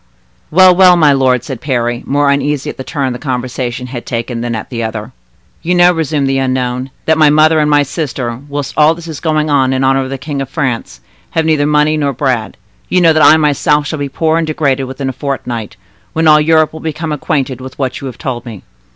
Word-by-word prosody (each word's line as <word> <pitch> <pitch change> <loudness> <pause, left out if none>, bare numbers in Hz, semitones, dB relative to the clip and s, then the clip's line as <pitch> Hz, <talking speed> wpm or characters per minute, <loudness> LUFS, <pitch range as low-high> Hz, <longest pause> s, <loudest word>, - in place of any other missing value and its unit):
'" - - -39
"Well, 185 +2 +6
well, 180 -1 +6
my 155 -4 +4
lord," 130 -2 +2
said 135 -6 -7
Parry, 120 -3 -1
more 145 0 +2
uneasy 140 0 -1
at - - -15
the 130 - -6
turn 135 -2 -2
the 125 - -7
conversation 125 -2 -4
had 125 -1 -7
taken 115 0 -4
than 120 -1 -3
at 110 - -7
the 115 -2 -3
other. 110 +1 -5 0.5
"You 180 +2 0
know," 175 0 +5
resumed 155 -3 -1
the 135 0 0
unknown, 130 0 -2 0.2
"that 160 0 +2
my 155 -1 +6
mother 155 +1 +4
and 150 0 +2
my 145 -1 +4
sister, 130 -5 -4
whilst 145 -1 -4
all 155 +1 +4
this 170 0 -10
is 155 -4 -6
going 155 -2 0
on 130 -2 +2
in 130 0 0
honor 135 0 +2
of 130 - -4
the 135 - -4
King 140 +1 -5
of 135 - -5
France, 135 -6 -3 0.3
have 160 -1 -1
neither 155 -2 +2
money 150 +1 +2
nor 140 -2 0
bread; 125 -6 -2 0.3
you 185 - +2
know 165 -2 +5
that 155 - +2
I 155 - +7
myself 150 -1 +1
shall 155 0 -4
be 140 -1 -3
poor 160 +3 0
and 165 - -2
degraded 140 -4 0
within 130 +1 -5
a 130 - -2
fortnight, 120 -7 -5 0.4
when 160 0 +1
all 150 0 +6
Europe 155 0 +3
will 160 - -8
become 160 0 -4
acquainted 135 -3 -2
with 130 0 -9
what 130 -1 -3
you 135 - -5
have 125 - -8
told 125 -3 -4
me. 110 -6 -10
140 Hz, 235 wpm, -14 LUFS, 130-155 Hz, 0.5 s, I